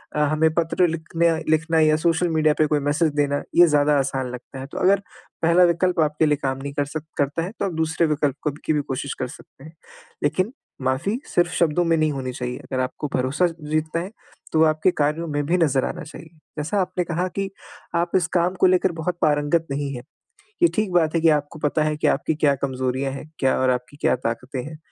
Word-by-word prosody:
अ, 150 - 0
हमें 155 +2 +3
पत्र 170 +2 +2
लिखने 165 +1 0 0.2
लिखना 160 +1 +2
या 155 -1 +5
सोशल 170 +2 +1
मीडिया 155 -1 +3
पे 155 - +4
कोई 150 0 +1
मैसेज 150 +2 +1
देना 145 -1 +1
ये 175 0 +8
ज़्यादा 150 -1 +3
आसान 135 -1 -2
लगता 125 +2 -9
है। 130 - -6
तो - - -7
अगर 195 +2 +4 0.4
पहला 170 +2 +5
विकल्प 175 0 +2
आप 150 -1 +1
के 160 - +5
लिए 150 -1 +2
काम 135 0 0
नहीं 140 0 -5
कर 145 -1 0
सक 150 +1 -6
करता 145 +3 0
है 180 - -5
तो - - 0
आप 190 - -2
दूसरे 160 +1 +1
विकल्प 145 -2 0
को 150 - 0
की 155 - +2
भी 150 - +1
कोशिश 135 0 -4
कर 130 - -1
सकते 135 +1 -15
हैं, 160 +2 -12 0.5
लेकिन 185 - 0 0.3
माफ़ी 145 - 0
सिर्फ 175 0 +2
शब्दों 170 +1 +2
में 165 0 +3
नहीं 155 -1 +2
होनी 130 -2 -4
चाहिए। 125 0 -4
अगर 130 - -4
आपको 130 +3 -3
भरोसा 135 +8 +1
जीतना 155 +2 -1
है 185 +4 -7 0.4
तो 160 0 +5
आपके 155 +3 +3
कार्यों 150 +2 -1
में 145 -1 -2
भी 175 +4 +2
नज़र 140 -6 +2
आना 175 - -5
चाहिए। 160 +1 -11 0.3
जैसा 175 +7 0
आपने 180 0 -1
कहा 175 +1 -1
कि 195 0 -1 0.5
आप 170 0 0
इस 180 -3 +3
काम 180 +2 +1
को - - +7
लेकर 185 0 +3
बहुत 170 +1 -3
पारंगत 150 +2 +2
नहीं 140 0 -2
है, 120 - -6 0.6
ये - - +9
ठीक 215 -3 0
बात 165 -2 +2
है 165 - +2
कि 165 - +5
आपको 150 +1 0
पता 150 +1 +1
है 155 0 0
कि - - +1
आपकी 150 +2 +1
क्या 145 -2 +3
कमज़ोरियाँ 130 0 -2
है, 135 - -6 0.2
क्या 135 -1 +2
और 130 0 +2
आपकी 125 +3 -4
क्या - - +3
ताक़तें 125 +2 -4
हैं। 155 +3 -8
155 Hz, 225 wpm, -23 LUFS, 140-170 Hz, 0.6 s, ये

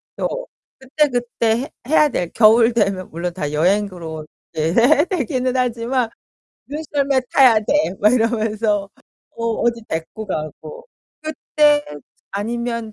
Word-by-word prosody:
또 - - -3 0.3
그때그때 250 -4 0
해 - - -9 0.2
해야 305 0 +4
될 175 -8 -3
겨울 225 +1 +5
되면 195 -5 0
물론 170 +2 -4
다 150 -5 -4
여행으로 170 -1 -1 0.3
네 160 +1 0 0.4
되기는 255 - -1
하지만 245 0 0 0.6
"눈썰매 285 -2 -1
타야 255 -5 +6
돼." 295 +1 +1
막 210 - +5
이러면서 220 -3 0 0.5
어 230 - -4
어디 230 0 0
데리고 165 +7 -5
가고. 195 - -6 0.4
그때 300 -1 +2 0.5
아니면 230 +2 -3
230 Hz, 235 characters per minute, -20 LUFS, 200-265 Hz, 0.6 s, 타야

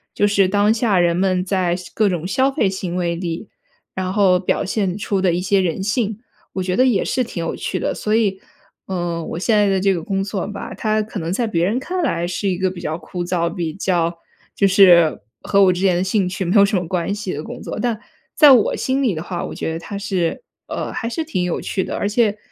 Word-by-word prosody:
就 205 - +2
是 200 -2 +3
当 205 +3 +3
下 220 -4 +1
人 170 -1 +3
们 185 0 +1
在 185 -3 0
消 180 -1 -9
各 215 -2 +2
种 175 -2 -3
消 260 +8 +2
费 220 - +1
行 190 -2 -4
为 175 -2 0
里， 170 +3 -5 0.4
然 185 0 -3
后 190 -3 +4
表 180 - -1
现 195 -2 -1
出 200 -2 -1
的 185 -2 +3
一 175 - 0
些 195 +1 +2
人 185 +1 -1
性， 215 0 -1 0.3
我 190 - -2
觉 180 0 -1
得 255 - +4
也 210 -7 +2
是 255 - 0
挺 175 -8 -5
有 - - -3
趣 - - -3
的。 - - -1
所 215 +1 -1
以， 200 -4 +1 0.5
呃， 175 -3 -2
我 160 - -5
现 215 +4 +1
在 205 -1 +4
的 195 -1 +2
这 195 0 +2
个 170 - -3
工 195 +2 -1
作 195 -1 -3
吧， 205 -1 -7
它 215 -1 0
可 210 -1 -6
能 165 0 -3
在 235 +5 0
别 170 -7 0
人 210 +6 0
看 360 +6 -3
来 175 - 0
是 180 +3 -2
一 180 - -1
个 185 0 0
比 175 -2 -9
较 160 -1 -3
枯 175 0 -6
燥， 175 -1 0
比 170 -2 -3
较 175 -3 0 0.4
就 200 - +3
是 180 -5 +6 0.2
和 200 0 +3
我 185 - +5
之 180 +1 -3
前 190 -2 +3
的 175 - +1
兴 190 0 +1
趣 190 +1 -3
没 180 +5 0
有 200 - +7
什 200 +1 -1
么 180 -3 -1
关 180 +1 -1
系 205 -3 -4
的 150 +2 -5
工 - - -8
作， - - -5
但 235 -3 -1 0.3
在 295 - +7
我 235 -5 +3
心 265 +1 0
里 235 -7 +2
的 160 - -4
话， 175 0 -4
我 - - -6
觉 - - -3
得 160 - -3
它 175 +4 -8
是， 190 - -1 0.3
呃， - - -4
还 230 - -4
是 320 +8 -2
挺 185 - -2
有 180 - -2
趣 190 - -2
的， - - -4
而 205 - -1
且 210 -1 +2
190 Hz, 270 characters per minute, -20 LUFS, 175-210 Hz, 0.5 s, 有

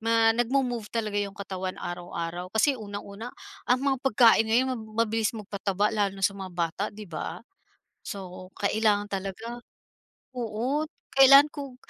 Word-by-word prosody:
ma 225 0 +4
nagmo-move 240 -1 0
talaga 215 -3 -1
'yong 200 0 -4
katawan 190 -2 -5
araw-araw. 175 0 -5
Kasi 280 +6 +4
unang-una 205 +2 -7 0.4
ang 250 +1 +4
mga 275 -1 +2
pagkain 230 -3 +5
ngayon 240 +4 +3
mab 245 - -4 0.2
mabilis 220 -1 0
magpataba 205 -1 -1
lalo 200 -2 0
na 195 - -2
sa 200 - +3
mga 195 -1 -7
bata, 170 +3 -1
'di 210 +1 -10
ba? 170 -5 -5 0.7
So, 185 -2 -8
kailangan 205 0 +2
talaga 195 +5 -5 0.8
oo, 245 +6 -1 0.3
kailangan 275 +2 +9
kug 275 -3 -7
215 Hz, 140 wpm, -27 LUFS, 195-235 Hz, 0.8 s, kailangan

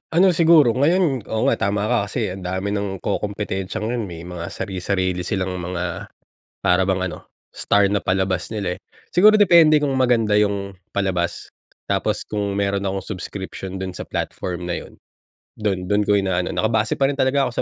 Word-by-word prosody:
Ano 185 +3 +6
siguro 160 -6 +6
ngayon, 145 - +2
oo 110 0 -2
nga, - - +1
tama 100 +1 0
ka 125 - +3
kasi 110 -2 -2
ang 95 0 -8
dami 95 +2 -2
ng 100 -2 -3
kokompetensiya 100 0 -3
ngayon. 115 +1 -2
May 85 -2 -8
mga 90 -1 -6
sarisarili 95 -1 -2
silang 95 -2 -2
mga, 90 -1 -4 0.6
para 90 +1 +4
bang 95 -1 0
ano, - - -11 0.2
star 100 0 +2
na 100 - +1
palabas 95 -1 0
nila, 95 -5 -2
eh. - - -42 0.3
Siguro, 215 +4 +6
depende 170 -6 +6
kung 140 -2 +1
maganda 120 -4 +2
yung 100 -1 -1 0.2
palabas. 95 -3 -2 0.3
Tapos, - - -1
kung 100 -1 -3
meron 100 0 0
akong 95 0 -3
subscription 95 -1 -6
dun 95 -1 -4
sa - - -7
platform 90 -1 -4
na 85 - -1
yun - - -13 0.6
dun 100 -4 -2
dun 105 +3 +1
ko 105 0 +2
ina-ano 95 -2 0
Naka-base 110 0 0
pa 135 - +1
rin 140 - -2
talaga 135 +1 +2
ako - - -5
100 Hz, 175 wpm, -21 LUFS, 95-115 Hz, 0.6 s, Ano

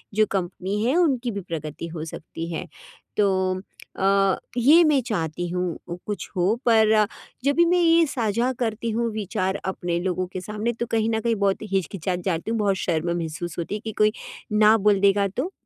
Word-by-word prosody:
जो 215 0 +5
कम्पनी 190 +2 -2
है 255 +6 +2
उनकी 260 -8 +2
भी 200 -1 -4
प्रगति 165 -2 -6
हो 160 -1 -6
सकती 165 +1 -7
है। 180 +2 -4 0.5
तो 190 -2 +1 0.4
अ, 195 0 +3 0.2
ये 295 +8 +7
मैं 300 -4 +3
चाहती 175 -5 -2
हूँ, 180 -1 -2 0.3
कुछ 205 -1 -4
हो, 185 +4 +2
पर 220 -2 +5 0.4
जब 280 +1 +2
भी 340 - +5
मैं 355 +1 +3
ये 335 0 +5
साझा 235 -1 0
करती 230 -1 -2
हूँ 230 +1 0
विचार 195 -2 -2
अपने 175 -2 -2
लोगों 185 0 -1
के 185 - -4
सामने, 210 +4 -2
तो 235 +1 -3
कहीं 225 0 +1
न 220 - +1
कहीं 230 0 +1
बहुत 200 -1 +1
हिचकिचाती 185 -1 -1
जाती 185 +3 -1
हूँ, 230 - 0
बहुत 200 -2 +2
शर्म 170 -1 -1
महसूस 165 0 -5
होती 170 +5 -3
है 210 - -5
कि 220 - -2
कोई 215 0 +4 0.4
ना 215 +1 +6
बोल 205 -1 +3
देगा 200 0 +4
तो। 330 +9 -1
200 Hz, 190 wpm, -24 LUFS, 180-225 Hz, 0.5 s, ये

